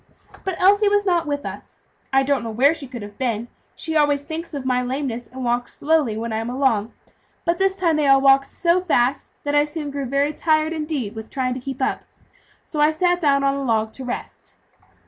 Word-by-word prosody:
But 380 -3 -3
Elsie 405 +3 +5
was 410 0 +2
not 345 -4 +1
with 285 -1 -2
us. - - -8 0.3
I 270 0 +4
don't 270 -2 +1
know 230 - -4
where 260 +7 +4
she 295 -4 -6
could 240 -4 -7
have 205 0 -11
been; 235 -3 -1 0.3
she 320 -1 -3
always 290 -2 +3
thinks 320 +1 -6
of 275 -2 -5
my 250 -1 +1
lameness, 250 -2 -3
and 255 0 -7
walks 240 0 -1
slowly 295 -8 +1
when 230 0 -3
I - - 0
am 225 +1 -3
along, 245 -4 +1 0.5
but 340 +1 +1
this 385 0 +2
time 335 -5 +1
they 300 -2 +2
all 275 0 +6
walked 275 0 +4
so 345 +1 +1
fast 275 -6 0
that 290 - -2
I 290 0 +5
soon 295 -1 -5
grew 280 -1 -3
very 280 +3 +1
tired, 310 +1 +1
indeed, 300 -9 -3
with 220 -1 -8
trying 255 -2 -1
to 255 - -5
keep 265 +1 -4
up. - - 0 0.6
So 300 - -3
I 300 - +6
sat 350 +3 +1
down 280 -3 +3
on 275 0 +3
a 275 - -3
log 220 -3 0
to 265 - -7
rest. 250 -1 -7
275 Hz, 225 wpm, -22 LUFS, 250-315 Hz, 0.6 s, all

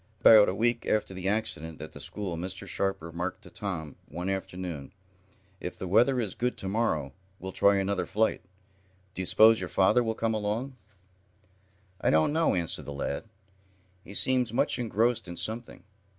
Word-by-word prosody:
About 110 -2 +8
a 95 - -2
week 120 +2 0
after 105 -2 0
the 95 0 -4
accident 100 -7 -3
at 80 - -8
the - - -11
school 100 -5 -5
Mr. 95 +3 -6
Sharp 95 -1 -1
remarked 85 +2 -5
to - - -14
Tom 80 -8 -5
one 90 +4 -4
afternoon: 90 -6 -5 0.7
"If 90 - -6
the 95 - -5
weather 120 +7 +4
is 105 -6 -2
good 125 +1 -2
to 95 - -5
morrow, 95 -10 0 0.2
we'll 95 -1 -6
try 100 +2 +4
another 95 0 -1
flight. 110 +1 +1 0.7
Do - - -4
you 95 - -2
suppose 110 +1 +6
your 90 -1 -4
father 100 +6 +4
will 110 -1 -1
come 115 0 0
along?" 110 +5 -2 1.3
"I - - +2
don't 80 - +3
know," 165 +1 +2
answered 85 -2 -2
the 75 - -6
lad. 70 +6 -3 0.8
"He 100 - -9
seems 125 -2 +3
much 120 - +1
engrossed 115 -1 +1
in 85 0 -7
something. 115 -4 -4
100 Hz, 175 wpm, -28 LUFS, 90-115 Hz, 1.3 s, About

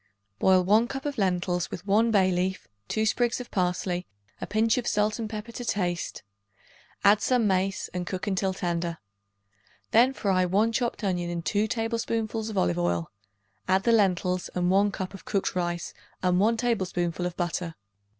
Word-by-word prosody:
Boil 185 -1 +5
1 215 +5 +4
cup 270 +2 -6
of 285 -4 -3
lentils 180 -2 0
with 175 - -7
1 215 +3 +3
bay 190 -4 +4
leaf, 185 +1 -1 0.2
2 220 - 0
sprigs 240 +3 +1
of 250 - -8
parsley, 180 -1 -1 0.3
a - - -4
pinch 220 +3 +2
of 240 - -5
salt 210 +2 +1
and 220 -2 -3
pepper 215 +1 -6
to 245 - -6
taste; 180 -6 -2 0.8
add 205 +1 +6
some 250 -3 +2
mace 190 0 0
and 180 -1 -3
cook 185 0 -3
until 190 -1 0
tender. 170 -2 -2 0.9
Then 240 +4 +5
fry 190 -7 +1
1 200 +5 +2
chopped 235 -1 -1
onion 180 -3 -1
in 170 -1 -3
2 205 +5 +1
tablespoonfuls 225 -1 -2
of 215 - -5
olive 90 -1 +1
oil; 85 -1 -1 0.6
add 190 +1 +3
the 235 - +3
lentils 185 -4 +2
and 180 0 +1
1 200 +2 +4
cup 190 0 -5
of 195 - -10
cooked 195 -2 -1
rice 175 -1 -2 0.3
and 180 0 +3
1 225 +3 +3
tablespoonful 180 -7 -1
of 180 - -8
butter. 175 -2 -2
195 Hz, 175 wpm, -27 LUFS, 180-220 Hz, 0.9 s, add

